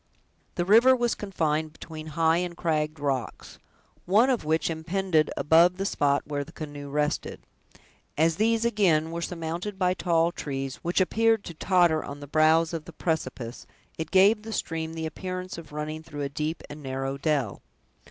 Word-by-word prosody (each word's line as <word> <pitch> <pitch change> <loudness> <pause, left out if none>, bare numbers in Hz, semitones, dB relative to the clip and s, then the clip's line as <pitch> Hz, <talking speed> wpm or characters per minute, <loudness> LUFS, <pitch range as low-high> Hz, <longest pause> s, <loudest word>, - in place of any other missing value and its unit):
The 175 - 0
river 235 +7 +6
was 240 -1 +1
confined 160 -6 -2
between 155 -1 -9
high 165 0 +4
and 175 -1 -3
cragged 155 -2 -1
rocks, 135 -5 -3 0.5
one 220 +8 +5
of 250 - 0
which 155 0 +1
impended 165 0 0
above 170 +4 +5
the 195 - -2
spot 145 -7 +1
where 145 -1 -3
the - - -14
canoe 145 -2 -7
rested. 150 +1 -2 0.7
As 160 +1 +3
these, 230 +1 +2
again, 175 -8 +2
were 170 0 -4
surmounted 170 +4 -4
by 180 -1 +2
tall 170 -2 +1
trees, 135 -5 -4
which 175 +3 0
appeared 225 +2 +2
to 170 - -8
totter 175 -2 +2
on 140 0 -7
the 145 - -8
brows 155 +3 +3
of 160 -2 -4
the - - -11
precipice, 135 -7 -3 0.3
it 160 -1 -5
gave 200 +4 +5
the 220 +1 -7
stream 160 -3 -3
the 160 0 -3
appearance 185 +2 -5
of 160 - -12
running 150 +1 -4
through 145 -2 -6
a 140 - -2
deep 155 +3 -3
and 150 +1 -9
narrow 135 0 -3
dell. 140 -8 -1
160 Hz, 170 wpm, -27 LUFS, 150-185 Hz, 0.7 s, river